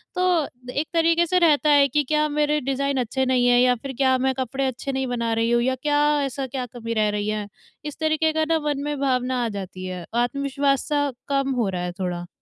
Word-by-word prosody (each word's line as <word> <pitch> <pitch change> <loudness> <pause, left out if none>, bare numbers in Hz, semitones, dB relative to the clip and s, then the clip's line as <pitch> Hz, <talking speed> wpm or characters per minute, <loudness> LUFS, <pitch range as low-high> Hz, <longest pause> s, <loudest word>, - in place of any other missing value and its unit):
तो 360 -4 +2 0.2
एक 300 +3 -2
तरीक़े 335 +1 +3
से 365 +2 +2
रहता 305 -3 +3
है 285 -1 +6
कि 295 +3 +1
क्या 305 +2 +1
मेरे 300 0 +1
डिज़ाइन 275 +1 -1
अच्छे 260 +2 -1
नहीं 255 -1 +2
हैं 245 0 +5
या 250 0 +4
फिर 275 -1 -6
क्या 260 -1 +3
मैं 265 +1 +1
कपड़े 265 +1 -2
अच्छे 260 +2 -4
नहीं 265 -1 -2
बना 235 -2 -1
रही 230 +1 +1
हूँ 240 0 +3
या 260 +1 +1
क्या 290 0 +2 0.3
ऐसा 270 0 -4
क्या 255 -1 -4
कमी 230 -1 -6
रह 215 -1 +2
रही 205 0 -2
है? 210 -1 -3 0.4
इस 295 - -6
तरीके 315 0 +1
का 315 0 +1
ना 325 -1 +3
मन 285 -1 -1
में 295 -1 -3
भावना 255 -2 0
आ - - -1
जाती 190 -2 -7
है। 180 -2 -6
आत्मविश्वास-सा 280 +2 0 0.2
कम 275 -1 0
हो 235 -5 0
रहा 180 -2 -3
है 180 - -3
थोड़ा। 175 -1 -3
265 Hz, 225 wpm, -23 LUFS, 240-290 Hz, 0.4 s, है